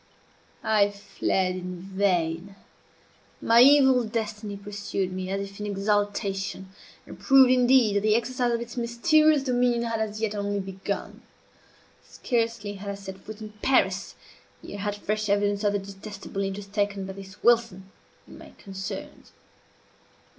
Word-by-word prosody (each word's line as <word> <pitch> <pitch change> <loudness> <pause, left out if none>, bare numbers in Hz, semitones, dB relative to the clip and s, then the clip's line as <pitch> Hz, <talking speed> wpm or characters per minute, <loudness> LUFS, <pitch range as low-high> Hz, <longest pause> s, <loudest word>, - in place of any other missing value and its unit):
I 215 -2 +3
fled 190 -2 -1
in 180 -1 -6
vain. 190 -1 -1 0.8
My 230 +1 +5
evil 265 -2 +6
destiny 215 -2 -4
pursued 200 -2 -4
me 185 0 -4
as 195 +1 -2
if 195 +1 -14
in 210 - -4
exultation, 200 -1 -1 0.4
and - - -12
proved, 270 -2 +6
indeed, 250 -4 +4
that - - +4
the 215 +1 +3
exercise 245 +1 0
of 235 0 -1
its 235 -1 -8
mysterious 290 +5 +3
dominion 245 -2 +1
had 230 -1 -2
as 215 -1 -3
yet 220 -2 -1
only 205 -1 -2
begun. 195 +1 -5 0.8
Scarcely 230 -4 -2
had 200 0 -7
I 200 - -3
set 195 -1 -9
foot 215 +2 -10
in 215 -1 -7
Paris, 195 -8 +1 0.5
ere 205 - -7
I - - -5
had 205 0 -2
fresh 215 +1 -2
evidence 205 0 +1
of 205 -1 +2
the - - +2
detestable 195 0 -7
interest 195 0 -5
taken 200 -2 -1
by 190 - -6
this 195 0 -12
Wilson 225 -5 +2 0.4
in - - -13
my - - -13
concerns. 195 -1 -8
205 Hz, 150 wpm, -26 LUFS, 195-230 Hz, 0.8 s, evil